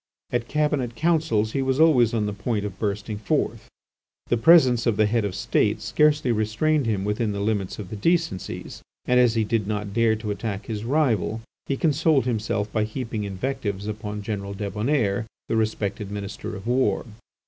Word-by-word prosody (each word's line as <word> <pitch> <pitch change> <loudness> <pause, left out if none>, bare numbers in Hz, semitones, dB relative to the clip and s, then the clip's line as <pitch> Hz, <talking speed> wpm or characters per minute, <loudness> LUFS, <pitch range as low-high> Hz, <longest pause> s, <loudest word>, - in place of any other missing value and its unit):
At 120 -1 -1
Cabinet 150 -5 0
councils 155 -9 +1
he 135 - -1
was 130 +1 0
always 130 -8 +5
on 110 -2 0
the 105 - -2
point 105 +1 -2
of 100 -3 -6
bursting 105 0 -2
forth. 105 - -1 0.6
The - - +3
presence 130 -3 +5
of 110 -3 +2
the 110 - +4
Head 115 +1 +1
of 100 -2 -2
the - - -6
State - - +1
scarcely 150 -4 +2
restrained 115 +6 +1
him 100 -3 0
within 105 +1 -1
the 100 - -3
limits 100 -2 -1
of 100 -4 -8
the - - -4
decencies, 165 - -1 0.2
and 125 0 +3
as 120 -2 +4
he 110 - +2
did 110 -2 -1
not 105 -1 -3
dare 115 0 +3
to 110 -1 -4
attack 100 -1 -4
his 110 -1 -4
rival 120 -5 +1 0.3
he 135 - -1
consoled 155 -2 +2
himself 105 -3 -1
by 110 - +2
heaping 110 -1 -4
invectives 100 0 -3
upon 105 -1 -5
General 100 -2 -4
Débonnaire, 105 +1 0 0.2
the - - -1
respected 105 -2 -1
Minister 100 +1 -5
of 95 - -9
War. 125 +2 +1
110 Hz, 180 wpm, -24 LUFS, 105-130 Hz, 0.6 s, always